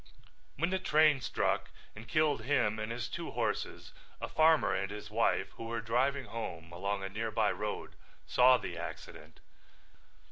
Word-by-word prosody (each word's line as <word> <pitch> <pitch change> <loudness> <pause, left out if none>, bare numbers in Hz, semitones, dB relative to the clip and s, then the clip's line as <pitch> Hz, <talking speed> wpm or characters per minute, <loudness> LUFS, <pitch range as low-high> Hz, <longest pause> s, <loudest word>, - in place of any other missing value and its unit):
When 170 +6 0
the 190 - +1
train 155 -5 +4
struck - - 0 0.3
and 110 +1 -10
killed 150 0 +2
him 110 -4 +1
and 110 +1 -3
his 120 0 -3
two - - -5
horses - - -3 0.3
a - - -4
farmer 160 -9 +4
and 95 +1 -1
his 105 0 -8
wife 115 +2 +1
who 115 - -6
were 115 0 -2
driving 130 +5 0
home 85 -7 -6
along 100 +3 -2
a 95 - -3
nearby 110 +1 0
road 105 0 -4 0.3
saw 125 +1 +6
the - - -6
accident. 75 +1 -9
115 Hz, 155 wpm, -32 LUFS, 105-140 Hz, 0.3 s, saw